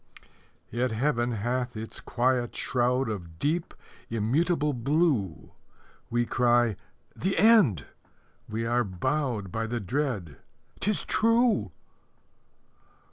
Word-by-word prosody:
Yet 125 Hz, +3 st, 0 dB
Heaven 120 Hz, 0 st, 0 dB
hath 120 Hz, +2 st, -2 dB
its 110 Hz, +1 st, -6 dB
quiet 120 Hz, 0 st, 0 dB
shroud 125 Hz, +1 st, +1 dB
Of 90 Hz, -7 st, -6 dB
deep, 160 Hz, -, -1 dB, 0.4 s
immutable 145 Hz, +8 st, +1 dB
blue 130 Hz, -, 0 dB, 0.6 s
We 120 Hz, 0 st, +1 dB
cry, 120 Hz, -3 st, +2 dB, 0.4 s
"The 195 Hz, +1 st, -1 dB
end!" 190 Hz, -, +5 dB, 0.6 s
We 115 Hz, +2 st, -2 dB
are 120 Hz, +1 st, +2 dB
bowed 105 Hz, +1 st, -2 dB
By 115 Hz, +2 st, -2 dB
the 120 Hz, +1 st, -2 dB
dread, 110 Hz, -, -2 dB, 0.4 s
"'Tis 210 Hz, 0 st, 0 dB
true!" 230 Hz, -, +2 dB
120 Hz, 100 wpm, -27 LUFS, 110-150 Hz, 0.6 s, end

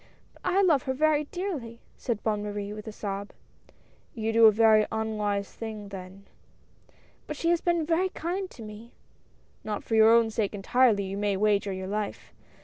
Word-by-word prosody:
" -, -, -35 dB
But -, -, -23 dB
I 370 Hz, +2 st, +3 dB
love 315 Hz, -8 st, +4 dB
her -, -, +2 dB
very 300 Hz, +1 st, +2 dB
dearly," 290 Hz, -11 st, -5 dB, 0.2 s
said 230 Hz, -4 st, -3 dB
Bonne 210 Hz, -2 st, 0 dB
Marie, 205 Hz, 0 st, -4 dB
with 215 Hz, +1 st, -9 dB
a -, -, -4 dB
sob. 200 Hz, -1 st, -5 dB, 0.4 s
" -, -, -34 dB
You 225 Hz, -1 st, -2 dB
do 225 Hz, 0 st, +8 dB
a -, -, +7 dB
very 215 Hz, 0 st, +5 dB
unwise 210 Hz, -2 st, -2 dB
thing, 215 Hz, -3 st, -7 dB
then." 190 Hz, 0 st, -10 dB, 1.0 s
"But 300 Hz, -, -5 dB
she 335 Hz, +2 st, +1 dB
has 345 Hz, -, +2 dB
been 345 Hz, -2 st, +1 dB
very 345 Hz, +4 st, +1 dB
kind 365 Hz, +3 st, -4 dB
to 230 Hz, -, -11 dB
me." 215 Hz, +2 st, -11 dB, 0.7 s
"Not 210 Hz, -1 st, -4 dB
for -, -, -5 dB
your 220 Hz, 0 st, +7 dB
own 230 Hz, -1 st, +4 dB
sake 215 Hz, -2 st, -1 dB
entirely, 210 Hz, +1 st, +3 dB
you 195 Hz, +1 st, -4 dB
may 205 Hz, -1 st, 0 dB
wager 205 Hz, -1 st, +2 dB
your 190 Hz, 0 st, -5 dB
life. 205 Hz, +1 st, -4 dB
220 Hz, 190 wpm, -27 LUFS, 205-260 Hz, 1.0 s, do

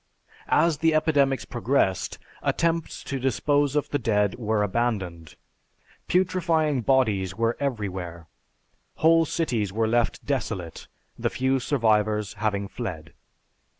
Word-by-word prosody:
As 165 Hz, -3 st, +3 dB
the 160 Hz, -1 st, +3 dB
epidemics 145 Hz, -4 st, +2 dB
progressed, 120 Hz, -5 st, 0 dB, 0.2 s
attempts 165 Hz, -1 st, -1 dB
to 135 Hz, -, -4 dB
dispose 145 Hz, +3 st, +1 dB
of 150 Hz, -, +1 dB
the 145 Hz, -, -1 dB
dead 105 Hz, -4 st, +1 dB
were 110 Hz, -3 st, 0 dB
abandoned. 95 Hz, -7 st, -2 dB, 0.7 s
Putrefying 165 Hz, -6 st, +1 dB
bodies 105 Hz, -8 st, +1 dB
were 115 Hz, +1 st, +1 dB
everywhere. 95 Hz, -10 st, -4 dB, 0.7 s
Whole 165 Hz, +1 st, +4 dB
cities 120 Hz, -, -1 dB
were 110 Hz, +2 st, 0 dB
left 120 Hz, +1 st, 0 dB
desolate, 105 Hz, -, -3 dB, 0.3 s
the -, -, 0 dB
few 130 Hz, +1 st, 0 dB
survivors 110 Hz, -5 st, +1 dB
having 105 Hz, -2 st, -1 dB
fled. 85 Hz, -9 st, -6 dB
120 Hz, 115 wpm, -25 LUFS, 105-145 Hz, 0.7 s, Whole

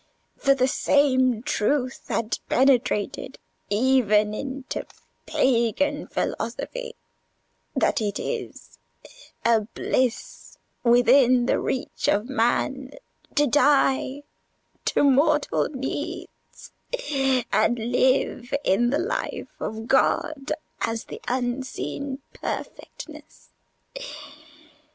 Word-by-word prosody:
For 275 Hz, 0 st, +3 dB
the 255 Hz, -1 st, +2 dB
same 260 Hz, -4 st, +2 dB
truth 255 Hz, +3 st, -1 dB
had 230 Hz, 0 st, -1 dB
penetrated 250 Hz, -1 st, +1 dB, 0.3 s
even 215 Hz, -2 st, +3 dB
into 270 Hz, +3 st, -5 dB, 0.4 s
pagan 245 Hz, +2 st, +1 dB
philosophy: 470 Hz, -, -4 dB, 0.8 s
that -, -, +2 dB
it 205 Hz, -2 st, -1 dB
is 480 Hz, -2 st, -6 dB, 0.7 s
a 230 Hz, -1 st, +5 dB
bliss 235 Hz, +2 st, -2 dB, 0.3 s
within 245 Hz, +1 st, +5 dB
the -, -, +2 dB
reach 255 Hz, -, -2 dB
of 210 Hz, +3 st, +2 dB
man 265 Hz, +2 st, 0 dB, 0.4 s
to 295 Hz, -, +4 dB
die 280 Hz, 0 st, +2 dB, 0.6 s
to -, -, +2 dB
mortal 290 Hz, +2 st, +3 dB
needs, 265 Hz, -2 st, -6 dB, 0.8 s
and 220 Hz, +3 st, +3 dB
live 250 Hz, +2 st, +1 dB
in 235 Hz, +6 st, +3 dB
the 280 Hz, -, +1 dB
life 430 Hz, +10 st, -3 dB
of 220 Hz, +1 st, -4 dB
God 275 Hz, +2 st, +1 dB, 0.3 s
as 225 Hz, 0 st, -1 dB
the -, -, -9 dB
Unseen 260 Hz, +2 st, -3 dB
Perfectness. -, -, -8 dB
260 Hz, 85 wpm, -24 LUFS, 235-275 Hz, 0.8 s, a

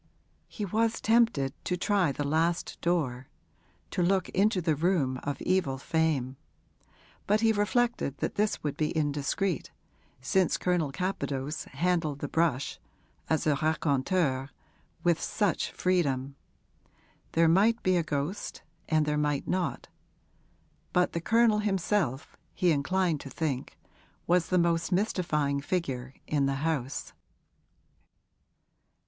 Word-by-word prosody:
He 210 Hz, -, -5 dB
was 225 Hz, +3 st, 0 dB
tempted 225 Hz, -, +2 dB
to 180 Hz, -, -1 dB
try 185 Hz, -4 st, +2 dB
the 145 Hz, -, -3 dB
last 165 Hz, +3 st, 0 dB
door 135 Hz, -7 st, 0 dB, 0.6 s
to 185 Hz, -, -1 dB
look 185 Hz, +1 st, +2 dB
into 200 Hz, 0 st, +2 dB
the 165 Hz, -3 st, +1 dB
room 145 Hz, -5 st, +1 dB
of 145 Hz, -1 st, -3 dB
evil 180 Hz, -8 st, +1 dB
fame; 135 Hz, -3 st, 0 dB, 0.9 s
but 210 Hz, +2 st, +3 dB
he 225 Hz, -1 st, +4 dB
reflected 210 Hz, -, 0 dB
that -, -, -2 dB
this 210 Hz, +1 st, 0 dB
would 145 Hz, -2 st, -2 dB
be 155 Hz, +1 st, -1 dB
indiscreet, 150 Hz, +5 st, -1 dB, 0.5 s
since 175 Hz, +7 st, +2 dB
Colonel 175 Hz, -6 st, 0 dB
Capadose 145 Hz, -4 st, -3 dB
handled 170 Hz, -5 st, 0 dB
the 145 Hz, -, -4 dB
brush 145 Hz, -4 st, 0 dB, 0.5 s
as 160 Hz, -, +1 dB
a 155 Hz, -, +4 dB
raconteur 145 Hz, -2 st, +1 dB, 0.5 s
with 170 Hz, -2 st, +2 dB
such 205 Hz, -5 st, 0 dB
freedom. 140 Hz, -7 st, 0 dB, 1.0 s
There 165 Hz, 0 st, +4 dB
might 210 Hz, +8 st, +3 dB
be 185 Hz, 0 st, +3 dB
a 175 Hz, -, +3 dB
ghost 150 Hz, +6 st, -3 dB, 0.3 s
and 155 Hz, -1 st, +3 dB
there 150 Hz, 0 st, 0 dB
might 145 Hz, -2 st, 0 dB
not; 185 Hz, 0 st, -1 dB, 1.1 s
but 180 Hz, -1 st, +2 dB
the 170 Hz, -, -2 dB
Colonel 225 Hz, +2 st, +4 dB
himself, 195 Hz, -, -1 dB, 0.2 s
he 180 Hz, -2 st, +3 dB
inclined 165 Hz, +2 st, +1 dB
to 135 Hz, -, -8 dB
think, 135 Hz, -2 st, -3 dB, 0.5 s
was 175 Hz, -1 st, +2 dB
the 185 Hz, -, +2 dB
most 170 Hz, 0 st, +1 dB
mystifying 165 Hz, -8 st, 0 dB
figure 135 Hz, -6 st, -3 dB
in 140 Hz, -2 st, +1 dB
the 135 Hz, -, 0 dB
house. 145 Hz, -4 st, -2 dB
165 Hz, 125 wpm, -29 LUFS, 140-185 Hz, 1.1 s, he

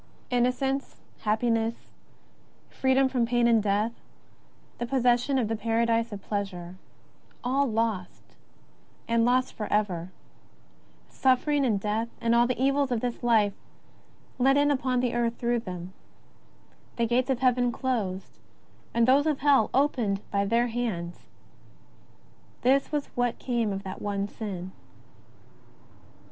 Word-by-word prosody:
Innocence, 260 Hz, +3 st, 0 dB, 0.2 s
happiness, 225 Hz, +1 st, +1 dB, 1.0 s
freedom 265 Hz, 0 st, +2 dB
from 250 Hz, -3 st, 0 dB
pain 240 Hz, 0 st, +2 dB
and 230 Hz, -2 st, +4 dB
death, 210 Hz, +2 st, +1 dB, 0.9 s
the 240 Hz, -, -2 dB
possession 250 Hz, +1 st, +2 dB
of 240 Hz, -4 st, +1 dB
the 225 Hz, -, -1 dB
paradise 230 Hz, +1 st, +1 dB
of 200 Hz, -2 st, -7 dB
pleasure 190 Hz, -4 st, -4 dB, 0.3 s
— -, -, -33 dB
all 270 Hz, +3 st, +1 dB
lost 220 Hz, -5 st, -3 dB, 0.7 s
and 230 Hz, 0 st, +2 dB
lost 255 Hz, +1 st, +2 dB
forever: 200 Hz, -5 st, -1 dB, 1.0 s
suffering 275 Hz, +2 st, +2 dB
and 220 Hz, -6 st, +1 dB
death, 215 Hz, +3 st, -1 dB
and 230 Hz, 0 st, +1 dB
all 235 Hz, 0 st, +4 dB
the 255 Hz, -, -2 dB
evils 275 Hz, 0 st, +2 dB
of 235 Hz, -2 st, 0 dB
this 245 Hz, -1 st, -3 dB
life 220 Hz, -4 st, +3 dB, 0.9 s
let 270 Hz, +2 st, +4 dB
in 290 Hz, 0 st, +3 dB
upon 255 Hz, -2 st, 0 dB
the 245 Hz, -1 st, 0 dB
earth 235 Hz, -1 st, 0 dB
through 240 Hz, 0 st, 0 dB
them; 180 Hz, -3 st, -7 dB, 1.0 s
the 235 Hz, -, +1 dB
gates 245 Hz, +3 st, +1 dB
of 260 Hz, -2 st, 0 dB
Heaven 250 Hz, -1 st, +3 dB
closed, 215 Hz, -8 st, -3 dB, 0.6 s
and 235 Hz, 0 st, +3 dB
those 280 Hz, +4 st, +4 dB
of 300 Hz, -3 st, 0 dB
Hell 275 Hz, -6 st, +4 dB
opened 245 Hz, -8 st, +1 dB
by 200 Hz, 0 st, +1 dB
their 230 Hz, +4 st, +2 dB
hands 225 Hz, -8 st, -4 dB, 0.7 s
— -, -, -31 dB
this 270 Hz, +2 st, +3 dB
was 295 Hz, -2 st, -1 dB
what 245 Hz, -1 st, 0 dB
came 235 Hz, -4 st, -1 dB
of 195 Hz, 0 st, -4 dB
that 190 Hz, -, -7 dB
one 200 Hz, -1 st, -2 dB
sin. 190 Hz, -4 st, -6 dB
235 Hz, 135 wpm, -27 LUFS, 210-255 Hz, 1.0 s, and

